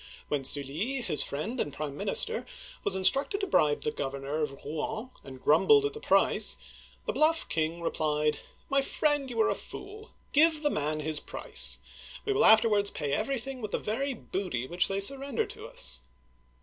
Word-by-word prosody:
When 145 -2 0
Sully, 150 - -1
his 195 -10 +1
friend 215 - -3
and 145 - -1
prime 145 -1 -5
minister, 215 - +1 0.4
was 190 - 0
instructed 270 - +2
to - - 0
bribe 150 - +2
the 150 - 0
governor 140 +1 -3
of 140 -2 -4
Rouen, 215 - -4
and 130 -1 -10
grumbled 420 - +5
at 425 - -1
the 450 - -7
price, 480 - +3 0.5
the - - -1
bluff 320 +1 +2
king 160 +1 -1
re - - 0
plied: 150 -1 0 0.2
" - - -34
My 275 0 +4
friend, 290 0 +1
you 235 -2 -4
are - - +3
a - - +2
fool. 425 +3 -9 0.2
Give 310 +1 +4
the 295 - +2
man 155 +1 0
his 155 0 -1
price. - - -1 0.5
We 415 - +1
will 410 - +3
afterwards 215 -2 +5
pay 145 -2 -3
everything 265 - -2
with 215 - -4
the - - 0
very 265 +5 -2
booty 180 - -3
which 175 +6 +2
they 195 0 -1
surrender 275 +4 +1
to - - -9
us 65 0 -3
200 Hz, 185 wpm, -29 LUFS, -, 0.5 s, grumbled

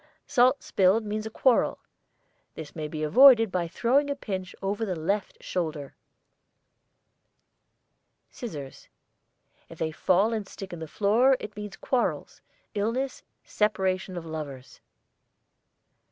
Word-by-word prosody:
SALT 255 +3 +3
spilled 195 +4 +2
means 215 +1 -3
a - - -5
quarrel. 245 +3 +2 0.8
This 155 -3 -9
may 155 -2 -4
be 155 0 -5
avoided 225 - +7
by 180 -2 -1
throwing 265 - +1
a 285 - -1
pinch 190 -8 -5
over 200 +3 -2
the 190 -5 -2
left 195 +6 -3
shoulder. 155 -6 -4 2.4
SCISSORS. 150 - -8 0.8
If 165 - -11
they 160 0 -2
fall 190 +7 +2
and 215 -3 -3
stick 195 -2 -9
in 170 - -6
the 160 - -6
floor 225 - +3
it 210 - -8
means 210 -1 -7
quarrels, 255 -2 -2 0.3
illness, 230 +6 -2 0.2
separation 190 -3 -1
of 170 - -6
lovers. 145 -5 -8
200 Hz, 125 wpm, -27 LUFS, 165-225 Hz, 2.4 s, avoided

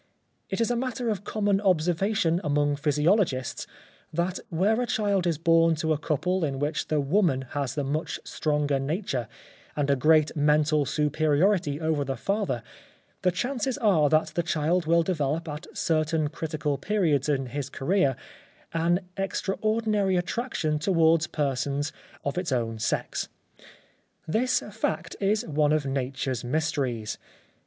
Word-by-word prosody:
It 195 - -2
is 230 +1 +1
a - - +1
matter 250 -1 -2
of 205 -2 -2
common 205 -2 0
observation 180 0 +1
among 145 -1 +1
physiologists 150 - +1 0.4
that 175 +3 -1
where 200 +8 +2
a 245 - -1
child 200 -5 +1
is 165 -3 +1
born 165 0 +4
to 155 0 0
a 150 - -2
couple 180 +4 0
in 140 -3 -1
which 145 +3 -1
the 155 - +1
woman 145 -2 +2
has 140 -3 -2
the 145 - -1
much 150 +4 -2
stronger 150 -2 0
nature 140 - -2 0.5
and 145 -1 +1
a - - +4
great 155 +3 +3
mental 150 -1 +3
superiority 150 +2 +1
over 160 -3 0
the 135 -1 -3
father 195 - -1 0.6
the 180 - +3
chances 250 +7 -2
are 180 -10 +3
that 155 +1 +3
that 165 +2 -2
child 165 +2 +1
will 170 +1 +4
develop 160 -2 -1
at 150 +2 -6
certain 155 -1 +1
critical 150 -3 -3
periods 165 -9 +1
in 135 -2 +1
his 135 +2 -4
career 140 -2 +1 0.6
an 170 +2 +2 0.2
extra 195 0 -1
ordinary 215 -3 +1
attraction 175 -5 -1
towards 165 -2 +3
persons 145 0 -1 0.3
of 140 +5 -1
its 180 -5 -3
own 115 -3 -1
sex. - - -2 1.0
This 250 +9 +1
fact - - -2
is 210 +2 +1
one 150 -1 +1
of 155 -2 +1
Nature's 135 -2 -2
mysteries. 125 -6 -1
155 Hz, 145 wpm, -26 LUFS, 145-185 Hz, 1.0 s, born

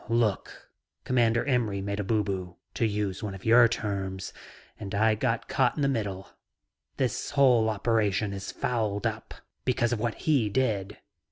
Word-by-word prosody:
"Look, 115 -4 -1 0.3
Commander 120 -2 +2
Imry 120 -7 0
made 100 +1 -3
a - - 0
booboo, 95 -4 -1 0.2
to 115 - +1
use 105 -2 -2
one 105 -3 -4
of 95 - -12
your 120 +1 +7
terms, 95 -4 -4 0.5
and 100 +1 -5
I 110 +2 +4
got 115 +2 -1
caught - - +1
in 145 - -1
the - - +3
middle. 100 -7 -3 0.7
This 130 -4 -1
whole 125 -6 +4
operation 105 -2 0
is 95 0 -5
fouled 110 -5 -2
up - - -3 0.3
because 120 -2 +1
of 115 - -2
what 115 0 -1
he 135 -9 +3
did. 105 -5 -1
110 Hz, 160 wpm, -27 LUFS, 100-120 Hz, 0.7 s, your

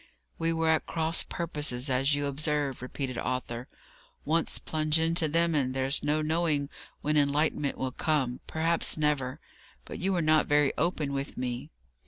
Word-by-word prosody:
"We 165 0 +1
were 165 0 0
at 160 -1 +2
cross 160 0 +2
purposes, 150 -6 -1
as 135 +2 +2
you 145 0 -1
observe," 145 -1 0
repeated 130 0 -4
Arthur. 125 -1 -3 0.6
"Once 165 +1 +1
plunge 155 0 +1
into 165 0 +2
them, 165 +2 +2
and 130 -3 0
there's 135 +2 +1
no 150 +1 +1
knowing 155 -3 0 0.3
when 150 +1 +1
enlightenment 145 0 +1
will 130 -1 -2
come; 135 -4 0
perhaps 165 +1 +1
never. 145 -4 0 0.5
But - - -7
you 190 +2 0
were 175 -3 +1
not 155 0 +4
very 145 -1 +3
open 155 -4 -1
with 140 0 -4
me." 125 -1 -3
150 Hz, 160 wpm, -29 LUFS, 135-160 Hz, 0.6 s, not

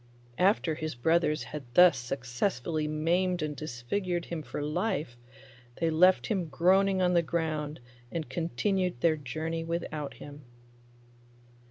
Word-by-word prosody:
After 185 -3 +3
his 155 -2 -4
brothers 155 +4 +2
had 150 - -6
thus 180 -1 +8
successfully 130 +5 -2
maimed 170 +3 +1
and 150 -1 -3
disfigured 165 +7 -3
him 170 -2 -4
for 150 - -6
life, 155 - -2 0.6
they 165 -1 +1
left 180 +4 +5
him 190 -6 -1
groaning 185 +5 +3
on 180 0 +3
the 170 - +5
ground 155 -3 -2 0.3
and 165 -2 -3
continued 180 - -1
their 165 -2 +4
journey 155 +4 -4
without 160 -3 -4
him. 145 0 -11
160 Hz, 130 wpm, -29 LUFS, 150-180 Hz, 0.6 s, thus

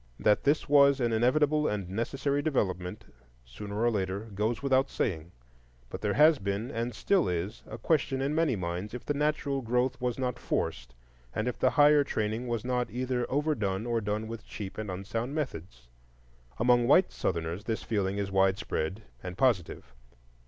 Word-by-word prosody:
That 105 -1 +2
this 145 +2 +2
was 140 -1 +5
an 120 -2 +1
inevitable 150 +6 +3
and 100 -3 -2
necessary 135 +8 -1
development, 105 - -2 0.4
sooner 100 - -7
or 120 +1 +3
later, 100 +1 -3
goes 110 +5 -1
without 135 0 +3
saying; 85 -3 -2 0.6
but 95 - -6
there 105 -1 0
has 155 0 +6
been, 100 +5 -3
and 120 0 -3
still 190 - +2
is, 90 +3 -3
a 110 - -7
question 135 +1 +1
in 135 +2 0
many 160 -5 +2
minds 90 +4 -4
if 125 - -8
the 145 - 0
natural 145 -1 0
growth 125 +2 0
was 125 -2 -1
not 125 -2 -2
forced, - - -3 0.4
and 110 - -1
if 125 - -3
the 130 - +4
higher 145 +1 +5
training 110 -2 -2
was 120 -1 -2
not 125 -1 0
either 125 0 -2
overdone 115 -9 0
or 120 -1 0
done 105 +1 -2
with 115 -1 -7
cheap 100 0 -7
and 110 -2 -4
unsound 115 +8 -4
methods. 85 - -5 0.7
Among 120 0 +3
white 180 +7 +5
Southerners 85 +4 -3
this 110 -1 -2
feeling 100 -2 -1
is 100 -1 -2
widespread 95 0 0 0.2
and 90 +1 -7
positive. 95 - 0
115 Hz, 170 wpm, -29 LUFS, 100-135 Hz, 0.7 s, has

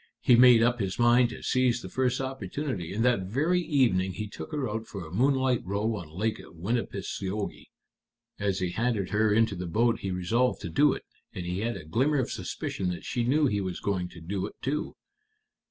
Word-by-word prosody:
He 125 - +5
made 120 -1 +7
up 120 +1 +2
his 95 -3 -2
mind 120 0 +5
to - - -9
seize 125 -2 +1
the - - -6
first 130 +5 0
opportunity, 130 - -4
and 115 +4 0
that 115 -7 +2
very 155 - +1
evening 115 - +2
he 105 +3 -4
took 105 - -9
her 145 -4 -1
out 110 +1 -4
for 95 -5 -7
a 80 - -11
moonlight 130 +2 +2
row 105 +4 -1
on 85 -7 -7
Lake 105 +7 -2
Winipiseogee. 100 +1 -4 0.7
As 100 -2 0
he 90 -2 -1
handed 110 -3 -1
her 110 0 +3
into 110 0 +3
the 90 0 -5
boat 115 +6 +2
he 95 - -4
resolved 105 +8 +1
to - - -5
do 145 0 +4
it, - - -7 0.3
and 90 - -4
he 90 +2 -2
had 115 +2 -2
a - - -10
glimmer 130 - +1
of 130 - -1
suspicion 90 - -3
that 90 - -5
she 120 - -1
knew 145 +6 +3
he 105 -7 +1
was 95 -2 -4
going 90 -3 -1
to 85 - -12
do 95 +3 -3
it, - - -12
too." 150 +3 -2
110 Hz, 205 wpm, -28 LUFS, 95-125 Hz, 0.7 s, made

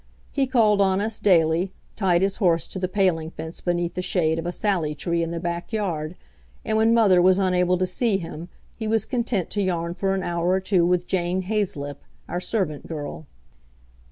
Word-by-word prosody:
He 275 -2 +1
called 220 -6 +3
on 190 -1 +3
us 215 +1 -2
daily, 170 -1 +3 0.2
tied 185 -3 +2
his 195 0 0
horse 170 -6 +2
to 190 - -7
the 185 - -1
paling 180 -5 +1
fence 160 0 -8
beneath 175 -1 -1
the 180 - -3
shade 165 -3 0
of 165 - -4
a - - -1
sallie 175 -6 -1
tree 170 +3 -1
in 165 - -1
the 170 0 -3
backyard, 170 -1 -3 0.5
and 220 - 0
when 220 +1 +4
mother 205 -6 +5
was 185 +1 +5
unable 180 -1 +2
to 185 - +1
see 200 +3 +1
him 165 -1 -7 0.3
he 220 - -4
was 220 -1 +1
content 235 -7 -1
to 205 - -1
yarn 170 -3 -1
for 195 +1 0
an 190 - -2
hour 170 0 -1
or 185 +1 +3
two 185 -2 +2
with 180 0 +1
Jane 180 0 -1
Haizelip, 180 -9 -2 0.3
our 175 - -3
servant 180 -9 -2
girl. 155 -1 -6
180 Hz, 195 wpm, -24 LUFS, 170-200 Hz, 0.5 s, mother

